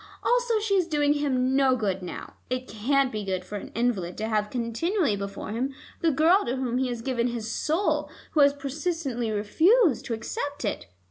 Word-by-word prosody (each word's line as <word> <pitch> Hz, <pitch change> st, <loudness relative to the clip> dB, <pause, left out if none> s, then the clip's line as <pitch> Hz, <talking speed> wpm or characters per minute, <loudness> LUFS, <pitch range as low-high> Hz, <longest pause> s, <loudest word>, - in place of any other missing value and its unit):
Also, 485 Hz, -2 st, +2 dB
she 420 Hz, -1 st, -1 dB
is 370 Hz, -4 st, +3 dB
doing 295 Hz, -3 st, +2 dB
him 265 Hz, -3 st, +1 dB
no 270 Hz, -2 st, +4 dB
good 195 Hz, -5 st, -1 dB
now. 180 Hz, -, -7 dB, 0.2 s
It 255 Hz, 0 st, -2 dB
can't 270 Hz, +5 st, +1 dB
be 215 Hz, -1 st, -3 dB
good 185 Hz, -2 st, -3 dB
for 205 Hz, -, -5 dB
an -, -, -8 dB
invalid 210 Hz, -7 st, 0 dB
to 220 Hz, -, -2 dB
have 210 Hz, -1 st, 0 dB
continually 250 Hz, -, 0 dB
before 200 Hz, 0 st, -5 dB
him 260 Hz, +5 st, -2 dB, 0.2 s
the 330 Hz, -, +3 dB
girl 325 Hz, +7 st, +4 dB
to 245 Hz, -, -1 dB
whom 255 Hz, -2 st, -1 dB
he 260 Hz, -, +1 dB
has 240 Hz, -2 st, -4 dB
given 245 Hz, -2 st, 0 dB
his 230 Hz, -2 st, -4 dB
soul, 325 Hz, +7 st, 0 dB, 0.2 s
who 310 Hz, -, +1 dB
has 285 Hz, -1 st, +7 dB
persistently 280 Hz, -3 st, -3 dB
refused 315 Hz, -, +3 dB
to 230 Hz, -, -2 dB
accept 285 Hz, -, -4 dB
it. 205 Hz, -, -3 dB
255 Hz, 195 wpm, -26 LUFS, 220-305 Hz, 0.2 s, has